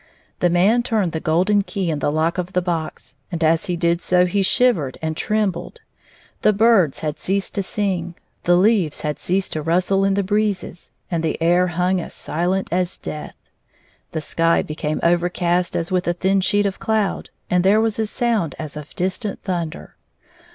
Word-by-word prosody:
The 175 - +3
man 195 +8 +3
turned 220 -7 0
the 160 - -3
golden 180 +6 +2
key 195 -3 -2
in 150 - -2
the 145 - 0
lock 160 +4 0
of 180 +1 -4
the 180 - +2
box, 160 -7 -4 0.2
and 170 -2 -2
as 160 +1 +2
he 180 - -1
did 170 0 +1
so 180 0 +3
he 195 +3 0
shivered 190 - +2
and 160 0 -3
trem 215 +2 +1
bled. 170 - -9 0.6
The 215 - +4
birds 205 -8 +3
had 150 -1 -3
ceased 195 +1 -1
to 200 - -1
sing, 185 -3 -2 0.3
the 175 - +5
leaves 185 -4 +2
had 150 -1 -3
ceased 185 +1 -1
to 155 - -2
rustle 180 +5 +1
in 195 0 +2
the 200 - +1
breezes, 205 -3 -2 0.2
and 170 -2 0
the 160 -1 -2
air 175 +2 +3
hung 180 +1 0
as - - -9
silent 180 +4 -1
as 180 0 -1
death; 150 - -7 0.8
the 160 - -3
sky 165 +2 +1
became 155 0 -3
overcast 175 +1 +1
as 170 +1 -2
with 180 -1 0
a 175 - +2
thin 190 +2 +1
sheet 205 +2 +2
of 195 -1 -2
cloud, 215 -3 -1 0.2
and 180 0 +2
there 200 +3 +5
was 225 -1 0
a 220 - 0
sound 225 - 0
as 155 -1 -7
of 150 0 -9
distant 190 +3 -3
thunder. 170 -4 -4
180 Hz, 190 wpm, -21 LUFS, 165-195 Hz, 0.8 s, the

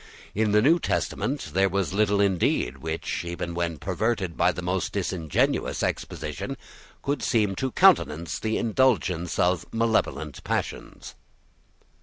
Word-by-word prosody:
In 110 0 +1
the 105 +1 +4
New 165 +6 +5
Testament 135 - -2
there 95 +2 +3
was 95 -1 -1
little 105 0 +2
indeed 90 -9 +1
which, 80 +3 -3
even 85 0 -4
when 85 -2 -2
perverted 95 - -1
by - - +3
the 90 - -6
most 90 +1 -1
disingenuous 90 -6 0
exposition, - - -3 0.5
could 140 0 -1
seem 105 -5 +2
to 130 -1 -1
countenance 85 - +3
the 110 0 -1
indulgence 100 -8 +1
of 90 -2 +2
malevolent 115 0 0
passions. - - -4
95 Hz, 130 wpm, -26 LUFS, 85-110 Hz, 0.5 s, New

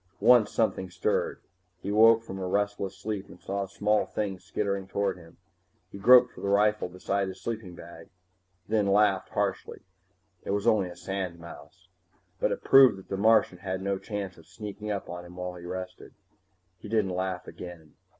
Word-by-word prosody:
Once 115 0 +6
something 95 -5 0
stirred. 90 - -1 0.4
He 100 - -4
woke 115 +2 +6
from 95 -4 -7
a 95 - -3
restless 100 0 -1
sleep 105 -2 -4
and 90 - -13
saw 100 0 -3
a - - -15
small 105 +2 +1
thing 100 -3 -3
skittering 100 +1 -3
toward 100 0 -1
him. 85 -2 -16 0.5
He 100 - -9
groped 125 +4 +7
for - - -12
the 100 - -2
rifle 105 -1 +2
beside 95 +2 -2
his 95 - -7
sleeping 110 -6 -5
bag, 85 -1 -12 0.6
then 105 -2 +1
laughed 100 -1 +3
harshly. - - -3 0.6
It - - -8
was 100 +1 0
only 105 -6 +3
a 90 - -10
sandmouse. 90 -2 -7 0.5
But - - +1
it - - -4
proved 135 -6 +7
that 95 - -14
the - - -2
Martian 105 -3 +3
had 95 0 -4
no 100 0 -1
chance 100 -3 -5
of 80 - -18
sneaking 105 +3 -7
up 100 -2 -3
on 90 0 -7
him 90 0 -13
while 90 0 -5
he 90 -1 -11
rested. 90 +1 -7 0.6
He 105 - -10
didn't 105 -4 +1
laugh 95 0 -3
again. 85 -4 -10
100 Hz, 180 wpm, -28 LUFS, 90-105 Hz, 0.6 s, groped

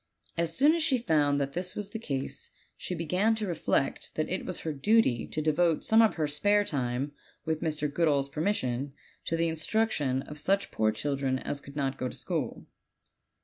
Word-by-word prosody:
As 165 -1 -1
soon 290 +4 +6
as 335 - 0
she 285 -5 +3
found 150 -10 +2
that 140 0 -2
this 180 +1 -3
was 205 -1 -4
the 225 - -4
case 135 -11 -4 0.3
she 180 - -4
began 180 +7 +1
to 220 -1 -2
reflect 165 -6 -1
that 155 - 0
it 185 - -2
was 185 - -3
her 160 - -2
duty 145 - +3
to 155 - -3
devote 160 +1 +2
some 220 +1 +5
of 225 - +4
her 155 - 0
spare 205 +8 +2
time, 135 -4 -1 0.3
with 160 -1 -1
Mr. 155 -2 0
Goodall's 145 -5 +2
permission, 140 -4 -1 0.3
to 165 - 0
the 165 0 +2
instruction 155 - 0
of 150 0 -8
such 195 +6 +1
poor 110 0 +2
children 135 +3 -1
as 140 +2 -4
could 140 0 -12
not 135 -2 -1
go 130 - -1
to - - -9
school. - - -3
155 Hz, 190 wpm, -29 LUFS, 140-195 Hz, 0.3 s, soon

